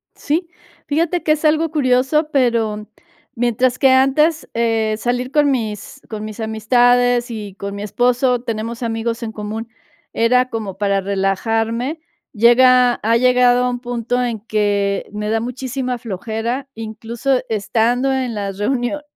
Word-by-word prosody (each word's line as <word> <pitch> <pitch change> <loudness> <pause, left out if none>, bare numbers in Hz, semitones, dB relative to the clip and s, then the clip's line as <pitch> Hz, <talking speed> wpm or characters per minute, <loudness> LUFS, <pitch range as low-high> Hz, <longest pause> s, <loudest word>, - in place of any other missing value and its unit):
Sí. 330 +4 -2 0.4
Fíjate 335 +4 0
que 305 - +3
es 310 +1 -3
algo 315 +1 +3
curioso, 285 +1 +2
pero, 225 -5 0 0.5
mientras 245 +1 +1
que 270 - +4
antes, 295 +5 +3
eh, 225 -2 +1
salir 245 +3 -2
con 290 -1 +3
mis 225 +1 -4
con 215 -1 -5
mis 215 +1 -8
amistades 245 +2 +2
y 210 -4 -6
con 200 0 -6
mi 200 - -5
esposo, 245 +3 +1
tenemos 230 0 -4
amigos 230 0 -2
en 220 - -4
común, 220 +2 -6 0.4
era 250 +2 +2
como 210 -4 -5
para 200 -1 +1
relajarme, 225 - -1 0.3
llega 245 +2 +5
ha 230 +1 +3
llegado 250 0 +4
a - - +1
un 245 0 -3
punto 245 0 -2
en 235 -3 -2
que 205 -2 0
me 210 0 -4
da 225 - +1
muchísima 250 +1 -3
flojera, 230 +5 -4
incluso 225 +4 -2
estando 235 +5 +1
en 260 -3 -1
las 200 -2 -4
reunio 245 +6 -1
235 Hz, 145 wpm, -19 LUFS, 220-255 Hz, 0.5 s, llega